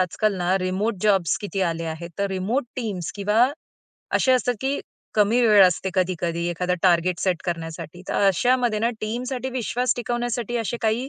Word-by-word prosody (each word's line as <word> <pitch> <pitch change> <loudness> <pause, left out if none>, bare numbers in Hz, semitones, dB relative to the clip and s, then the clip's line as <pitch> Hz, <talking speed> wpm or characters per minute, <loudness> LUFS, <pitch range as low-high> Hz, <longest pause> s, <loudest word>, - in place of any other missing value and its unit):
आजकाल 200 +3 +1
ना 180 +1 +1
remote 190 +4 -1
jobs 195 -7 +3
किती 200 -1 -3
आले 165 0 -3
आहेत, 165 +2 -5
तर 200 - +1
रिमोट 205 +9 -1
टीम्स 200 -9 -3
किंवा 210 +5 +3 0.7
असे 260 - +3
असतात 250 -1 +2
की 275 +1 0 0.3
कमी 215 +3 +3
वेळ 205 -3 +7
असते 185 +2 -1
कधी-कधी 175 -2 -1
एखादा 180 +1 -1
टार्गेट 180 0 +3
सेट 180 -4 0
करण्यासाठी. 165 0 -5
तर 200 - +2
अशामध्ये 240 +3 +2
ना 230 +1 +2
टीमसाठी 250 +4 -3
विश्वास 250 0 0
टिकवण्यासाठी 240 0 -2
असे 230 +1 -2
काही 225 +4 0
200 Hz, 160 wpm, -23 LUFS, 180-240 Hz, 0.7 s, वेळ